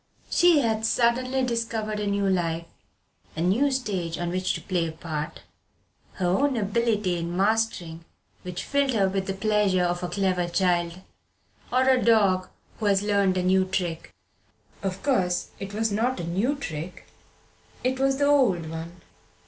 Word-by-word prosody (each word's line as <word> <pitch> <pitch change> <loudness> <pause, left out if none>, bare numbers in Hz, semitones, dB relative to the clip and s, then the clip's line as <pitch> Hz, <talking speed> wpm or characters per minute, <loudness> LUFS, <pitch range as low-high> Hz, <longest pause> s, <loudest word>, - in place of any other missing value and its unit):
She 345 -4 +5
had 220 -3 0
suddenly 255 +3 +1
discovered 225 -3 -2
a 210 - -2
new 200 0 +1
life 170 -3 0 0.7
a 160 - -3
new 210 +12 +3
stage 195 -11 -2
on 175 0 -2
which 185 +1 -1
to - - -5
play 175 -3 -1
a - - -4
part, 160 -1 -5 0.7
her 185 - -3
own 255 +9 +2
ability 210 -4 0
in 170 +1 -4
mastering 195 -5 0 0.4
which 180 -1 -5
filled 280 -2 +1
her 200 -4 +3
with 190 0 -2
the 195 - -2
pleasure 205 -3 +2
of 175 0 -1
a 180 - -3
clever 185 -3 0
child, 175 0 0 0.7
or 255 +1 +3
a 260 -1 +4
dog 200 -5 +3 0.3
who 215 - 0
has 200 0 +3
learned 200 -2 +2
a 180 - 0
new 190 +1 +3
trick. 180 -3 -3 0.7
Of 195 -1 -4
course, 185 -10 0
it 195 0 -6
was 220 +1 -1
not 235 +5 0
a - - -3
new 195 - 0
trick; 180 - -6 0.8
it 260 +1 0
was 270 0 +2
the 285 - +2
old 205 - +3
one. 165 +2 -7
195 Hz, 165 wpm, -25 LUFS, 175-230 Hz, 0.8 s, She